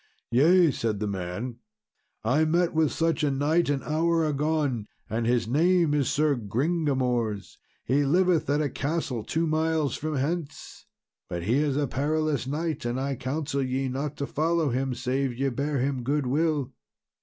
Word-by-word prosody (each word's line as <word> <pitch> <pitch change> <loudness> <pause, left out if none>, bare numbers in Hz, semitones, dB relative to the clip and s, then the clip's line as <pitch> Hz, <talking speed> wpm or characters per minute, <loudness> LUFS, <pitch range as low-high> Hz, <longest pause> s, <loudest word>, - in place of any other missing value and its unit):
"Yea," 165 +6 +5
said 110 -4 -2
the 105 - -1
man, 100 +5 -4 0.7
"I 130 +8 +3
met 170 +2 +2
with 160 -2 +2
such 165 -1 0
a 150 - +3
knight 145 +4 +1
an 140 -2 0
hour 165 +1 +1
agone, 145 -6 0 0.2
and 115 +1 -1
his 120 -2 +1
name 165 +4 +3
is 145 -3 +1
Sir 150 -1 +2
Gringamors. 125 - -1 0.3
He 140 +4 +2
liveth 175 +3 +2
at 145 +2 +2
a 145 - -1
castle 140 -6 -2
two 165 +7 -1
miles 160 -2 0
from 155 0 -3
hence; 150 +3 -4 0.4
but 85 -1 -4
he 115 +8 +2
is 145 -2 +1
a 145 - +1
perilous 150 +1 -1
knight, 155 +2 -2
and 120 +2 -2
I 135 +1 -1
counsel 140 +2 -2
ye 130 0 -1
not 140 +3 -3
to 140 - -2
follow 160 +1 0
him 130 +1 -1
save 130 +1 -1
ye 135 +1 +1
bear 140 +3 -2
him 135 0 -1
goodwill." 145 +1 0
140 Hz, 165 wpm, -26 LUFS, 125-155 Hz, 0.7 s, Yea